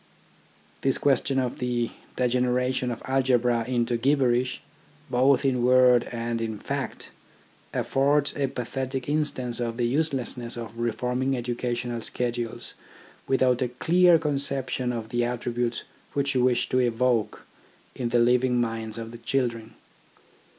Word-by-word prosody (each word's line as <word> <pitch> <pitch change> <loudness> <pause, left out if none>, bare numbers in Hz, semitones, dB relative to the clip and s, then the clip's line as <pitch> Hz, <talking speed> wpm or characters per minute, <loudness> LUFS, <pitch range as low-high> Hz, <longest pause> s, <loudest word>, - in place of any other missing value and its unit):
This 135 - +1
question 135 -1 +1
of 125 -2 -1
the 120 -2 -1 0.2
degeneration 125 0 +1
of 120 - -5
algebra 125 -3 +2
into 120 -1 0
gibberish, 125 -1 +1 0.5
both 130 +3 +3
in 125 -2 +1
word 125 -1 +5
and 115 -1 -3
in 110 -1 -3
fact, - - -5 0.6
affords 140 +2 +1
a 140 -2 0
pathetic 130 +1 -4
instance 145 -5 -1
of 115 -1 -2
the 120 - +1
uselessness 125 -4 -1
of 115 -1 -7
reforming 125 +3 -1
educational 120 0 -3
schedules 120 -1 -3 0.5
without 130 -1 +2
a 125 - +2
clear 175 +7 +4
conception 140 -4 -1
of 115 -2 -5
the 120 0 0
attributes 120 0 -2 0.3
which 140 0 0
you 125 -2 +2
wish 125 -1 +2
to 130 - +2
evoke 120 -2 0 0.5
in 120 -2 -3
the 120 - +2
living 125 +1 +3
minds 115 -2 -3
of 115 0 -6
the 120 - -10
children. 115 -2 -2
125 Hz, 130 wpm, -26 LUFS, 120-130 Hz, 0.6 s, word